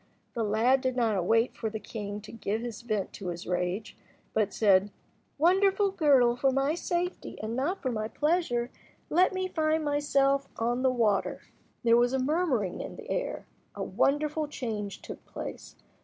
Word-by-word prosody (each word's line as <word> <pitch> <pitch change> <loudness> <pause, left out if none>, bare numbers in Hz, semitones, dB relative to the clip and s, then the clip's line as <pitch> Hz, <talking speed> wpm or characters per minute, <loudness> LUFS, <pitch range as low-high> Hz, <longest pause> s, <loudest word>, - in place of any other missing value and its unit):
The 230 - -1
lad 225 +5 +3
did 255 -1 -1
not 230 -4 +2
await 225 +6 +2
for 220 - -3
the 220 0 -5
king 205 -2 -6
to 215 - -11
give 220 0 -3 0.2
vent 210 -4 -1
to 195 - -7
his 175 0 -5
rage, 180 +4 -2 0.4
but 210 -2 +1
said— 200 -2 +4 0.5
"Wonderful 385 +5 +3
girdle, 275 -9 +4
for 270 +2 +2
my 275 +3 +1
safety, 350 +1 -3
and 220 +2 -3
not 300 +10 -1
for 260 - 0
my 215 -2 -2
pleasure, 275 -3 0 0.4
let 360 +3 +4
me 375 0 -1
find 315 -2 0
myself 275 -1 +2
on 240 +2 0
the 260 - +4
water." 225 -6 +1 0.4
There 230 0 +5
was 245 +1 +3
a 265 - +1
murmuring 260 - 0
in - - -7
the - - -8
air. - - -2 0.3
A - - -3
wonderful 300 +2 +1
change 215 -8 -5
took - - -8
place. - - -7
245 Hz, 170 wpm, -29 LUFS, 215-300 Hz, 0.5 s, There